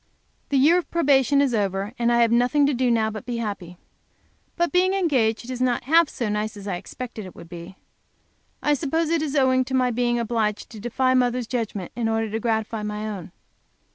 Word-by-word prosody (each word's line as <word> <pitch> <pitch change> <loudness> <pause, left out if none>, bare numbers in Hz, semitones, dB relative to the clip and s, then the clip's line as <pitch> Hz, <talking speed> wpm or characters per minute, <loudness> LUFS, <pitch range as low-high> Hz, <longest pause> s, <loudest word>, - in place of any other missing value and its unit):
The 280 - +2
year 315 +7 +5
of 355 - -8
probation 280 -4 +3
is 265 -3 0
over, 200 0 -1
and 235 0 +2
I 235 0 +4
have 230 - +2
nothing 250 +5 +3
to 285 - +2
do 255 0 +1
now 220 -2 +2
but 215 - -5
to - - -19
be 240 -1 -2
happy. 200 -6 -5 0.8
But 345 0 0
being 370 +1 +3
engaged 255 - +1
is 255 0 -5
not 250 -2 +1
half 320 +4 +4
so 235 - -3
nice 210 0 -2
as 200 0 -9
I 185 -3 -2
expected 235 +3 -8
it 185 - -13
would 170 - -12
be. 175 +2 -10 0.9
I 295 - +3
suppose 310 +3 0
it 335 -2 +2
is 305 -2 -3
owing 260 -2 +3
to 265 - -3
my 255 -1 +2
being 240 0 0
obliged 225 -3 -1
to 220 - -9
defy 255 +4 +1
mother's 250 -1 +1
judgment 220 -6 -4
in 230 -1 -1
order 225 -1 -1
to 220 - -2
gratify 220 -1 -1
my 210 0 -4
own. 195 -5 -6
240 Hz, 215 wpm, -24 LUFS, 215-265 Hz, 0.9 s, year